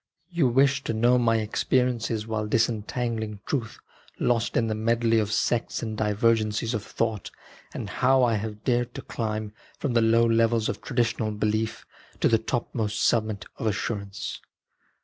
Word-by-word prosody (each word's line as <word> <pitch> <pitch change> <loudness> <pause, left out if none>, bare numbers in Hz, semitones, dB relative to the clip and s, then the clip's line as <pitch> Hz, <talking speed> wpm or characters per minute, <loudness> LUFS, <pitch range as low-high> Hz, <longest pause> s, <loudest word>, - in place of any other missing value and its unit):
You 170 -6 +2
wish 135 +2 +3
to - - -1
know 120 +3 +4
my 115 -1 +3
experiences 115 0 0
while 110 -1 -2
disentangling 110 -1 -1
truth 115 -6 -2 0.4
lost 120 -2 +1
in 115 - +3
the 110 - -1
medley 115 +1 +2
of 105 -1 -1
sects 120 +1 0
and 110 -1 -3
divergencies 110 +1 +1
of 110 - -1
thought, 110 -3 -2 0.4
and - - -5
how 130 0 +3
I 120 -2 +3
have 105 0 -4
dared 120 -1 0
to - - -6
climb 110 -2 -3 0.2
from 140 -5 -2
the 115 - +4
low 115 +1 +4
levels 115 -1 +2
of - - -4
tradi 125 -2 +1
tional 110 -3 -3
belief 110 +1 -1 0.3
to - - +3
the 115 - +3
topmost 110 -2 -2
summit 110 -2 +1
of 115 - -1
assurance. 100 -1 -3
115 Hz, 160 wpm, -26 LUFS, 110-120 Hz, 0.4 s, know